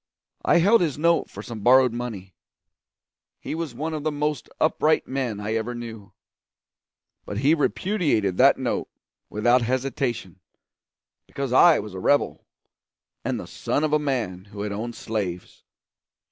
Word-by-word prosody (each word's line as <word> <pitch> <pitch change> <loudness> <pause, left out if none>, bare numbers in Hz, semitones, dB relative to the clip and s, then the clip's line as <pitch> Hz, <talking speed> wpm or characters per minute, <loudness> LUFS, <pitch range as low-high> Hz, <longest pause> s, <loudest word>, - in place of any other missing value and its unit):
I - - +4
held 200 +6 +5
his 155 -6 0
note 170 +2 +2
for 100 - -9
some 115 -1 -7
borrowed 125 +2 +5
money. 110 -6 -6 1.1
He - - -5
was 160 -6 -4
one 160 +5 -3
of 155 - -3
the 155 - 0
most 150 -2 -2
upright 155 0 +2
men 130 -6 -2
I 105 +1 -3
ever 115 +2 -2
knew; 115 -4 -8 1.1
but 100 - -6
he 140 +7 +3
repudiated 150 - 0
that - - +6
note - - -2 0.4
without 120 +4 +3
hesitation, 125 - -2 0.9
because 135 -3 -4
I 165 +4 +7
was 105 -2 -6
a 95 - -6
rebel, 145 +9 +1 0.8
and - - -2
the - - -7
son 145 - -2
of 155 -1 0
a 150 - +4
man 115 -11 -2
who 100 0 -9
had 105 - -3
owned 115 +3 -4
slaves. 95 -6 -5
125 Hz, 150 wpm, -24 LUFS, 105-150 Hz, 1.1 s, I